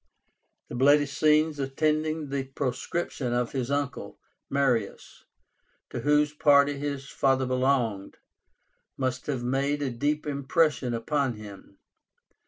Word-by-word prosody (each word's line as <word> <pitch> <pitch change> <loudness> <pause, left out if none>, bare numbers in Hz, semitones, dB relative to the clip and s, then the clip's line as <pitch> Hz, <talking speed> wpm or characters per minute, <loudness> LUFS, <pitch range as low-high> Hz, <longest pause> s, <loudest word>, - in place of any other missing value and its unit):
The - - -10
bloody 145 +4 +4
scenes 150 +1 +2
attending 155 +2 -1
the 135 -1 -2
proscription 135 0 -3
of 120 -1 0
his 130 -2 -3
uncle 140 0 -3 0.3
Marius, 125 -7 -1 0.7
to - - -4
whose 150 +3 +2
party 145 -2 +4
his 140 -1 -4
father 135 -1 +1
belonged, 125 -6 0 0.8
must 130 -1 -2
have 135 -5 -2
made 140 +3 0
a 135 - -1
deep 145 +6 -1
impression 140 -2 +1
upon 130 +3 0
him. 100 -2 -12
140 Hz, 115 wpm, -27 LUFS, 125-145 Hz, 0.8 s, bloody